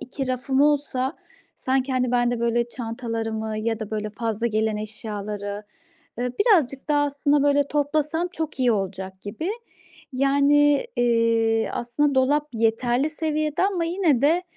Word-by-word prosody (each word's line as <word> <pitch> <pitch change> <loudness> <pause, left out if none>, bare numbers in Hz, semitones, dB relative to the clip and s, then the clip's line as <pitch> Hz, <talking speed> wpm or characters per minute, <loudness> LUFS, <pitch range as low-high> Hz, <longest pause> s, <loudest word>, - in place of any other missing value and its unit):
2 265 +1 -5
rafım 260 +1 0
olsa 285 -2 +1 0.4
sanki, 265 0 0
hani, 255 -1 +1
ben 240 0 +2
de, 240 - -2
böyle, 235 0 +1
çantalarımı 225 -2 -4
ya 225 0 -2
da, 215 - -5
böyle, 215 -1 -3
fazla 225 +1 -2
gelen 220 -1 0
eşyaları, 210 -1 -5 0.6
ııı, 250 0 -1
birazcık 315 - +2
daha 290 -1 +3
aslında, 285 0 +1
böyle, 285 0 +3
toplasam 305 +3 0
çok 320 -5 -5
iyi 250 -2 +4
olacak 190 -2 -4
gibi. 230 - -4 0.6
Yani, 285 +2 +3
eee, 230 -2 +2
aslında 280 +4 0
dolap 290 +3 +2
yeterli 240 +5 +1
seviyede 310 0 -1
ama 380 -4 +1
yine 330 -7 +1
de, 330 +5 +3
255 Hz, 140 wpm, -24 LUFS, 225-290 Hz, 0.6 s, iyi